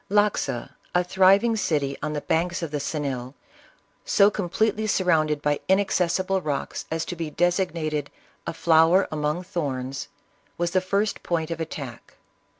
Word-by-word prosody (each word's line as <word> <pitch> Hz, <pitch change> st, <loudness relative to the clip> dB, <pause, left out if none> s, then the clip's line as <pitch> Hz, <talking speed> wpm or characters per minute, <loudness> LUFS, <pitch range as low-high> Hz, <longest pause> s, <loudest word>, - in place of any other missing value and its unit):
Loxa, 205 Hz, -, +1 dB, 0.2 s
a 180 Hz, -, +4 dB
thriving 195 Hz, +5 st, +4 dB
city 145 Hz, -9 st, 0 dB
on 150 Hz, +1 st, -2 dB
the 150 Hz, -, -2 dB
banks 170 Hz, +3 st, 0 dB
of 160 Hz, -, -4 dB
the 150 Hz, -, -2 dB
Xenil, 140 Hz, -3 st, -3 dB, 0.7 s
so 200 Hz, 0 st, +4 dB
completely 215 Hz, +3 st, 0 dB
surrounded 155 Hz, -7 st, +2 dB
by 145 Hz, 0 st, +1 dB
inaccessible 190 Hz, -1 st, +2 dB
rocks 145 Hz, -4 st, -3 dB
as 160 Hz, 0 st, -2 dB
to 175 Hz, -, -5 dB
be 165 Hz, -2 st, -4 dB
designated 165 Hz, -4 st, 0 dB, 0.2 s
" -, -, -22 dB
a -, -, -2 dB
flower 165 Hz, +3 st, +4 dB
among 150 Hz, +3 st, -1 dB
thorns," 135 Hz, -7 st, -3 dB, 0.5 s
was 175 Hz, 0 st, 0 dB
the 185 Hz, -, +2 dB
first 200 Hz, +3 st, 0 dB
point 165 Hz, -1 st, -2 dB
of 165 Hz, 0 st, -3 dB
attack. 140 Hz, -7 st, -7 dB
165 Hz, 150 wpm, -25 LUFS, 150-185 Hz, 0.7 s, a